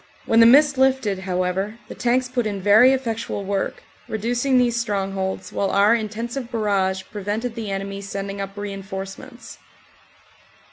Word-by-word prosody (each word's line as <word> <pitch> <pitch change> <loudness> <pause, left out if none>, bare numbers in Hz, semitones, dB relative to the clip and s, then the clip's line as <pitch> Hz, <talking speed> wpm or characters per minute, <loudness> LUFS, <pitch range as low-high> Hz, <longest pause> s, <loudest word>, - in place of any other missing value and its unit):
When 225 - +3
the 230 - +8
mist 285 +2 +5
lifted, 260 -7 +2
however, 190 +3 -2
the - - -8
tanks 250 +1 +1
put 245 -3 -1
in 200 -2 -3
very 210 +7 +6
effectual 230 -5 -2
work, 195 0 -2 0.2
reducing 240 +5 0
these 245 -2 +3
strongholds, 195 -3 -3
while 195 - 0
our 205 +3 +4
intensive 235 +3 -3
barrage 195 -4 0
prevented 210 +4 -3
the 225 -3 -5
enemy 195 0 -4
sending 200 0 -5
up 195 +1 -7
reinforcements. 195 -1 -7
205 Hz, 140 wpm, -22 LUFS, 195-235 Hz, 0.2 s, the